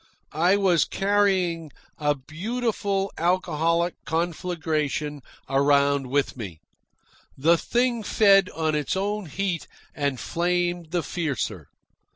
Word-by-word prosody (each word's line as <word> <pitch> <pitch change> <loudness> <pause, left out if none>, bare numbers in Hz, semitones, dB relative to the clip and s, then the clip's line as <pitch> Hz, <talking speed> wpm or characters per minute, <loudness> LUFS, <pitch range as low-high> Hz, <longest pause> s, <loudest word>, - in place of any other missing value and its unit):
I 175 +6 +3
was 185 -5 +3
carrying 190 -5 +1 0.3
a 145 -1 +2
beautiful 200 - -2
alcoholic 170 -1 +1
conflagration 160 -3 -2 0.3
around 140 0 +3
with 140 +2 0
me. 95 -10 -7 0.8
The 160 +5 +4
thing 240 +6 0
fed 200 -3 +4
on 160 -1 0
its 150 +4 -1
own 205 0 -2
heat 180 +1 -2 0.3
and 140 -3 -1
flamed 175 +2 -1
the 175 0 -1
fiercer. 130 - -3
170 Hz, 105 wpm, -25 LUFS, 150-195 Hz, 0.8 s, The